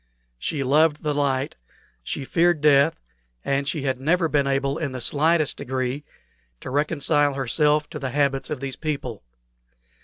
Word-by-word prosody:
She 140 - -2
loved 150 +3 +3
the 150 -1 0
light, 140 - -1 0.4
she 135 - -4
feared 175 +2 +2
death, 145 +1 +4 0.5
and 140 0 0
she 145 -1 -1
had 130 -2 -1
never 165 +5 +2
been 145 -3 +1
able 140 +1 0
in 145 -5 -3
the 130 - -4
slightest 155 +5 +1
degree 130 +2 -3 0.6
to - - -6
reconcile 145 0 +1
herself 150 +3 +1
to 150 - -5
the 135 -2 -3
habits 140 0 0
of 150 -3 -4
these 135 -1 -4
people. 140 -8 -4
145 Hz, 155 wpm, -24 LUFS, 135-150 Hz, 0.6 s, death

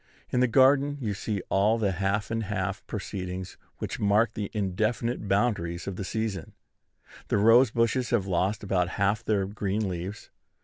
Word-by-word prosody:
In 125 - +1
the 125 - +4
garden 140 +3 +4
you 110 -6 -2
see 100 -1 -3
all 105 +4 +3
the 105 -4 +1
half 100 +4 -1
and 115 -1 -1
half 100 -1 -3
proceedings 95 -3 -5 0.2
which - - -5
mark 105 +2 +3
the 105 -2 -4
indefinite 110 +3 -1
boundaries 95 -5 0
of 100 - -4
the 100 - -4
season. 105 -3 -3 0.7
The - - +1
rose 115 +4 +6
bushes 115 +2 +1
have 115 -6 +1
lost 95 +3 0
about 90 -3 +1
half 100 +3 +1
their 105 -3 +1
green 100 +1 -2
leaves. 90 +3 -6
105 Hz, 165 wpm, -27 LUFS, 95-115 Hz, 0.7 s, rose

